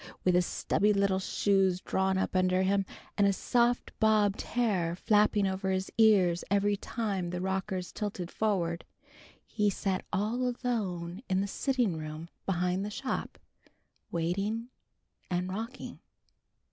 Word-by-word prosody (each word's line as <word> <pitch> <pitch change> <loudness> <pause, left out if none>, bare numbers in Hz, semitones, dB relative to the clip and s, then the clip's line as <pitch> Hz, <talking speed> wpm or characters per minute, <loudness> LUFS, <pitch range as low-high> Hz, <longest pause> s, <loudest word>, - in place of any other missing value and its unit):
With 180 - +3
his 180 0 +3
stubby 210 +1 +1
little 200 -1 +2
shoes 190 -1 +2
drawn 190 0 0
up 190 - -1
under 185 0 +3
him, 195 0 +1 0.3
and 200 - +5
his 195 -2 +1
soft 240 0 +1
bobbed 215 -2 +3
hair 195 -8 0
flapping 210 +1 +3
over 190 0 -1
his 190 0 -1
ears 195 -6 +4
every 200 +1 +2
time 200 -4 -3
the 180 0 -3
rockers 190 0 -2
tilted 195 -5 -4
forward, 175 -6 0 0.6
he 210 -2 +1
sat 190 -1 -1
all 240 +5 0
alone 190 -7 -3
in 185 0 +2
the - - 0
sitting 245 - 0
room 155 +1 -6 0.2
behind 180 0 0
the 205 - -3
shop, 260 +5 -4 0.7
waiting 200 +8 -1 0.6
and 180 +1 -1
rocking. 230 +6 -6
195 Hz, 135 wpm, -30 LUFS, 185-215 Hz, 0.7 s, and